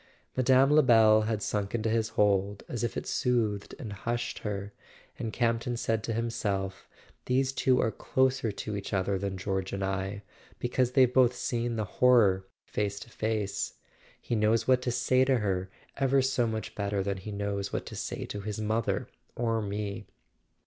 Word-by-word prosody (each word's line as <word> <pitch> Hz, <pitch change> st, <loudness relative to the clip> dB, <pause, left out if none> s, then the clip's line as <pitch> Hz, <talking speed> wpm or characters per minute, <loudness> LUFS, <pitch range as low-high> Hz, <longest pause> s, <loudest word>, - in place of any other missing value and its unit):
Mme. 130 Hz, +2 st, +4 dB
Lebel 115 Hz, -7 st, +6 dB
had 110 Hz, -2 st, -1 dB
sunk 100 Hz, 0 st, -2 dB
into 115 Hz, -1 st, -1 dB
his 110 Hz, 0 st, +1 dB
hold 100 Hz, -1 st, +2 dB
as 120 Hz, -, -4 dB
if 120 Hz, -, -2 dB
it -, -, -3 dB
soothed 110 Hz, -5 st, 0 dB
and 115 Hz, -9 st, -6 dB
hushed 115 Hz, +5 st, -3 dB
her; 100 Hz, -1 st, -4 dB, 0.5 s
and 115 Hz, -3 st, -3 dB
Campton 120 Hz, +1 st, 0 dB
said 115 Hz, -2 st, -1 dB
to 115 Hz, -, -2 dB
himself: 100 Hz, -4 st, -2 dB, 0.4 s
"These 130 Hz, +1 st, +2 dB
two 130 Hz, -1 st, +2 dB
are 110 Hz, -, +2 dB
closer 130 Hz, -3 st, +1 dB
to 105 Hz, +1 st, -5 dB
each 100 Hz, 0 st, -5 dB
other 95 Hz, 0 st, +1 dB
than 100 Hz, -1 st, -3 dB
George 95 Hz, 0 st, -2 dB
and 100 Hz, 0 st, -2 dB
I, 95 Hz, +1 st, -2 dB, 0.3 s
because 125 Hz, 0 st, 0 dB
they've 130 Hz, -2 st, +5 dB
both 125 Hz, -1 st, +4 dB
seen 120 Hz, -1 st, -2 dB
the 110 Hz, -1 st, -1 dB
horror 100 Hz, -5 st, +4 dB, 0.2 s
face 100 Hz, -1 st, -2 dB
to 115 Hz, -, -11 dB
face. 110 Hz, -3 st, -2 dB, 0.4 s
He -, -, -5 dB
knows 110 Hz, +1 st, +2 dB
what 130 Hz, -1 st, +4 dB
to 125 Hz, -, -1 dB
say 125 Hz, +1 st, +3 dB
to 130 Hz, -1 st, +3 dB
her 95 Hz, -4 st, -1 dB, 0.3 s
ever 135 Hz, 0 st, +3 dB
so 130 Hz, -3 st, +1 dB
much 110 Hz, -1 st, -4 dB
better 100 Hz, -1 st, -1 dB
than 100 Hz, 0 st, -2 dB
he 95 Hz, +3 st, -7 dB
knows 100 Hz, -1 st, -3 dB
what -, -, -3 dB
to -, -, -8 dB
say -, -, -4 dB
to 100 Hz, -, -6 dB
his 105 Hz, +1 st, -4 dB
mother 110 Hz, +1 st, -1 dB, 0.3 s
or 115 Hz, -1 st, 0 dB
me." 100 Hz, -1 st, -4 dB
110 Hz, 175 wpm, -29 LUFS, 100-120 Hz, 0.5 s, Lebel